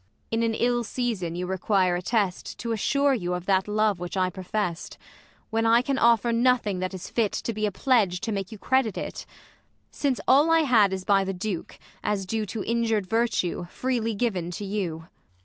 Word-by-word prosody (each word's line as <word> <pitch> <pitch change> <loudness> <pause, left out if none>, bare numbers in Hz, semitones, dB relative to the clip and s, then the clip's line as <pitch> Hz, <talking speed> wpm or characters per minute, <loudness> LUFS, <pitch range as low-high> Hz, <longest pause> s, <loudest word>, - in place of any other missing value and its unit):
Ang. 225 - +1
In - - +1
an 230 -1 +1
ill 240 +1 +1
season 215 -8 -2
you 180 +1 -3
require 185 0 +1
a 175 - -2
test, 200 -2 -1
T'assure 270 +5 +1
you 180 -7 -1
of 180 0 -6
that 190 0 +2
love 210 -2 +1
which 175 +2 -5
I 185 -1 +1
profest; 185 -1 -4 0.5
When 225 0 +1
I 230 +2 +4
can 275 0 -1
offer 235 0 +4
nothing 230 -5 +2
that 185 +1 -3
is 185 - -7
fit, 225 -4 +1
To 230 - -3
be 215 0 0
a - - -2
pledge 205 -6 +2
to 225 - -2
make 195 -1 -3
you 220 - -8
credit 260 0 +1
it; - - -6 0.6
Since 275 -4 -1
all 285 +5 +5
I 330 0 +5
had 230 -9 +4
is 190 -1 -4
by 200 -2 +4
the 195 0 -3
Duke, 185 -1 -4 0.3
as 205 -2 -1
due 215 +2 -2
To 210 +1 -4
injur'd 225 -3 0
virtue, 225 -4 0
freely 230 +3 -2
given 195 -6 -1
to 200 +4 -5
you. 180 -5 -3
210 Hz, 200 wpm, -26 LUFS, 185-235 Hz, 0.6 s, all